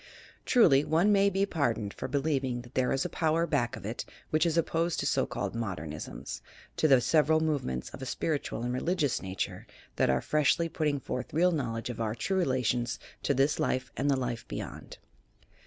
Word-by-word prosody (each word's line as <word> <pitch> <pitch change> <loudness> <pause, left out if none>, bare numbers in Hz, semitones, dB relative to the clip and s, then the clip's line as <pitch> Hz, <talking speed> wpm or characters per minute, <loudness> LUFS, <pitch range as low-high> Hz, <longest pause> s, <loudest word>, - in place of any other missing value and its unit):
Truly, 145 - +5
one 170 +8 +3
may 200 0 +5
be 195 0 +1
pardoned 115 - -1
for - - -5
believing 135 -3 0
that 120 +1 -15
there 130 -1 +1
is 135 - +1
a - - +1
power 165 +1 +1
back 120 -5 0
of - - -9
it 110 +3 -3 0.3
which 155 +2 +3
is 165 0 0
opposed 165 +1 +1
to - - -1
so - - +1
called - - -3
"Modernisms" 90 -10 -5 0.2
— - - -25
to 155 - +3
the 135 -3 +6
several 155 +4 +3
movements 140 - -1
of - - -10
a 130 - -5
spiritual 145 -7 -2
and 125 0 -1
religious 150 0 0
nature 95 -1 -4 0.3
that - - +3
are 65 -1 +3
freshly 155 - +2
putting 150 -3 0
forth 125 +1 -5
real 180 +3 +4
knowledge 120 -6 -2
of 115 - -6
our 110 -1 -1
true 190 - 0
relations 125 -6 0 0.2
to 140 - +1
this 135 +3 +2
life 130 0 -1
and 140 +2 0
the 135 - +3
life 120 -3 -3
beyond. - - -7
135 Hz, 195 wpm, -30 LUFS, 120-160 Hz, 0.3 s, the